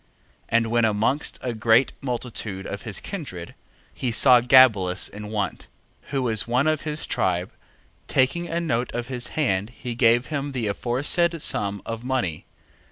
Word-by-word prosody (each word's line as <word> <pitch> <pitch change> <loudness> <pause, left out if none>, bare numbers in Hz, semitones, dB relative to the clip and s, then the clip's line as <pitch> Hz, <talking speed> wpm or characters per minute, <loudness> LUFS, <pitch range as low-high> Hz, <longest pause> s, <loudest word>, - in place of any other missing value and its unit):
And 115 0 +3
when 120 0 +2
amongst 110 +7 +1
a 125 -2 -2
great 115 +3 +3
multitude 115 -6 -4
of 100 - -5
his 105 -5 -3
kindred, 135 - -7 0.4
he 125 - -2
saw 125 +1 +6
Gabelus 115 -8 +5
in 105 +1 -8
want, 105 -2 -3 0.4
who 135 -2 -1
was 110 -3 +2
one 125 +4 +1
of 155 -2 +1
his 150 0 -3
tribe, 90 0 -1 0.6
taking 155 +7 +1
a 165 +1 -2
note 125 -8 -1
of 120 +1 -4
his 125 -2 -2
hand 105 -9 0
he 120 0 -7
gave 120 +1 +3
him 145 -2 -4
the 125 -4 -2
aforesaid 140 - +1
sum 100 -7 -1
of 115 0 -5
money. 125 -12 -2
120 Hz, 160 wpm, -24 LUFS, 105-135 Hz, 0.6 s, saw